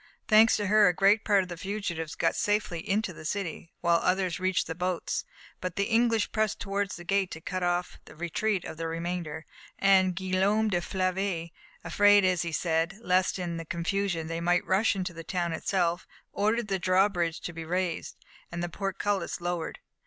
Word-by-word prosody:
Thanks 220 +1 +6
to 205 - -2
her 210 +1 +5
a 180 - +2
great 200 +3 +4
part 200 -2 +3
of - - -8
the 175 - -5
fugitives 170 -4 -4
got - - +1
safely 205 -5 0
into 200 -1 0
the 155 - -11
city, 165 -1 -4
while 170 -1 +4
others 185 -1 0
reached 185 -1 +1
the 165 - -4
boats; 180 +1 -2 0.3
but 185 -1 -4
the 200 - +1
English 230 0 +2
pressed 215 -2 0
towards 200 0 -2
the 175 - -9
gate 195 +1 +1
to 160 - -7
cut 185 +3 -4
off 175 0 -1
the - - -14
retreat 175 +4 -1
of - - -7
the 165 0 -3
remainder, 165 -2 -4 0.3
and 190 -2 +4
Guillaume 195 +3 +1
de 175 -3 0
Flavy, 185 -2 -2 0.3
afraid, 205 +4 +5
as 180 -3 +2
he 170 - -3
said, 165 +2 0
lest 185 -3 +1
in 175 -2 -3
the 165 - -5
confusion 170 0 -1
they 165 +1 -4
might 175 +1 +2
rush 200 +3 +2
into 185 -2 -3
the 165 0 -8
town 175 -1 -2
itself, 175 +1 -1 0.3
ordered 215 +2 +1
the 195 -1 -1
draw 185 +2 +4
bridge 175 -4 -2
to 170 - -5
be 165 0 -6
raised, 175 0 -2 0.4
and 170 0 -4
the 175 - -2
portcullis 195 0 -2
lowered. 175 -2 -3
185 Hz, 190 wpm, -28 LUFS, 170-200 Hz, 0.4 s, Thanks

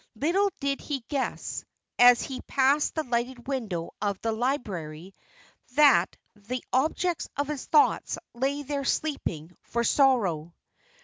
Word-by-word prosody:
Little 345 - +2
did 275 -1 -1
he 280 -3 -3
guess, 275 -3 -3 0.4
as 245 0 +7
he 265 -2 -6
passed 280 +2 +2
the 315 - 0
lighted 245 0 -3
window 215 -12 -3
of 200 -2 -1
the 225 - 0
library, 195 - -3 0.6
that 280 -12 +5 0.2
the 215 +5 -5
objects 320 +6 0
of 285 0 0
his 295 -3 -4
thoughts 300 - +3 0.2
lay 275 +4 -1
there 280 0 -3
sleeping 180 - -2
for 235 0 -1
sorrow. 195 - +2
255 Hz, 130 wpm, -27 LUFS, 210-285 Hz, 0.6 s, as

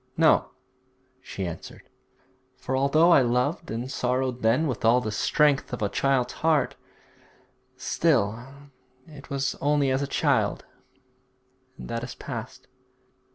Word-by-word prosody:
'No,' - - +4 0.7
she 95 - -6
answered; 85 -2 -9 0.7
'for 130 - -3
although 155 +6 +4
I 155 - +7
loved 125 +7 0
and 120 +4 -4
sorrowed 125 -1 -1
then 115 +8 +2
with 130 -6 -3
all 115 +2 +5
the 110 -3 -4
strength 145 +5 +1
of 120 - -3
a 100 - 0
child's 130 -1 0
heart, 155 -5 +2 1.0
still 120 -8 0 0.6
it 150 -3 -14
was 135 0 -1
only 145 -1 +2
as 130 +1 0
a 140 - -2
child, - - 0 1.1
and 60 - -9
that 115 0 -4
is 120 - -7
past.' 120 +1 -8
130 Hz, 130 wpm, -26 LUFS, 120-140 Hz, 1.1 s, I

